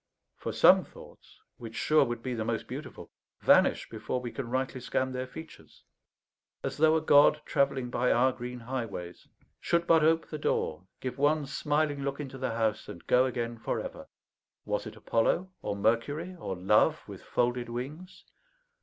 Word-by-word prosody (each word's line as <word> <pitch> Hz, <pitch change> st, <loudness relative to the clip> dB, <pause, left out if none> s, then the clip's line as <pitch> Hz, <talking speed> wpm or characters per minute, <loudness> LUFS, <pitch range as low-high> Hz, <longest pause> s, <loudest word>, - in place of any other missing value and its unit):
For -, -, -5 dB
some -, -, +6 dB
thoughts, -, -, -16 dB, 0.2 s
which 115 Hz, -1 st, -9 dB
sure 155 Hz, -1 st, +4 dB
would 120 Hz, -2 st, -4 dB
be 130 Hz, -, -2 dB
the 115 Hz, -2 st, -2 dB
most -, -, -2 dB
beautiful, -, -, -8 dB, 0.3 s
vanish -, -, +4 dB
before 125 Hz, -, -4 dB
we 120 Hz, -1 st, -6 dB
can 130 Hz, -4 st, -5 dB
rightly 130 Hz, +1 st, -2 dB
scan 130 Hz, +1 st, -1 dB
their 130 Hz, 0 st, -4 dB
features; 160 Hz, +4 st, -12 dB, 0.8 s
as -, -, -3 dB
though 160 Hz, +1 st, +5 dB
a 160 Hz, -, +2 dB
god, 150 Hz, 0 st, +6 dB
travelling 135 Hz, -4 st, 0 dB
by 125 Hz, +1 st, +1 dB
our 130 Hz, +2 st, +4 dB
green 125 Hz, 0 st, -7 dB
highways, 115 Hz, -8 st, -6 dB, 0.3 s
should 170 Hz, 0 st, +1 dB
but 165 Hz, -2 st, +5 dB
ope 165 Hz, +1 st, +3 dB
the 155 Hz, -, -6 dB
door, 80 Hz, -, -1 dB
give 130 Hz, +1 st, -5 dB
one 150 Hz, +1 st, +2 dB
smiling 145 Hz, +1 st, -1 dB
look 140 Hz, +1 st, -3 dB
into 135 Hz, -2 st, -7 dB
the 130 Hz, -, -1 dB
house, 110 Hz, -2 st, -1 dB
and 85 Hz, -, -10 dB
go 125 Hz, +1 st, +4 dB
again 120 Hz, -2 st, -4 dB
for -, -, -2 dB
ever. -, -, -7 dB, 0.6 s
Was -, -, -2 dB
it -, -, -9 dB
Apollo, 180 Hz, +11 st, 0 dB
or 100 Hz, -, -3 dB
Mercury, 145 Hz, -, 0 dB
or 95 Hz, -, -4 dB
Love 95 Hz, +4 st, +2 dB
with -, -, -9 dB
folded 120 Hz, 0 st, -1 dB
wings? 145 Hz, +10 st, -7 dB
130 Hz, 170 wpm, -29 LUFS, 120-150 Hz, 0.8 s, some